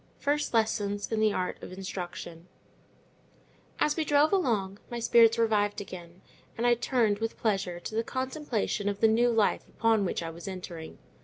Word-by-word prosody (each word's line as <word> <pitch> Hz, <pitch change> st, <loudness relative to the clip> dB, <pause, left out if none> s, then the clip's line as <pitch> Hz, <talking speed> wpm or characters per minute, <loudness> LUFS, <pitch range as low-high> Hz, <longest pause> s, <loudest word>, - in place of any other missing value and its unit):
FIRST 290 Hz, +1 st, 0 dB
LESSONS 205 Hz, -2 st, 0 dB
IN 220 Hz, -, 0 dB
THE 215 Hz, -1 st, +3 dB
ART 185 Hz, -2 st, -3 dB
OF -, -, -9 dB
INSTRUCTION 180 Hz, -2 st, -7 dB, 1.3 s
As 300 Hz, -, +2 dB
we 320 Hz, -, 0 dB
drove 295 Hz, +3 st, +3 dB
along, 210 Hz, -, 0 dB
my 240 Hz, -1 st, -4 dB
spirits 230 Hz, -1 st, +5 dB
revived 210 Hz, -3 st, +1 dB
again, 180 Hz, -2 st, -10 dB, 0.3 s
and 235 Hz, -, -1 dB
I 240 Hz, -, +6 dB
turned, 235 Hz, -3 st, +1 dB
with 225 Hz, 0 st, -3 dB
pleasure, 195 Hz, -6 st, -1 dB
to -, -, -7 dB
the 225 Hz, +1 st, 0 dB
contemplation 260 Hz, -6 st, -2 dB
of 200 Hz, 0 st, -4 dB
the 225 Hz, -, +5 dB
new 235 Hz, +2 st, +3 dB
life 225 Hz, -3 st, +1 dB
upon 225 Hz, -2 st, +2 dB
which 180 Hz, -, -2 dB
I 165 Hz, -, -4 dB
was 170 Hz, +3 st, -10 dB
entering. 175 Hz, -4 st, -7 dB
215 Hz, 170 wpm, -29 LUFS, 190-235 Hz, 1.3 s, I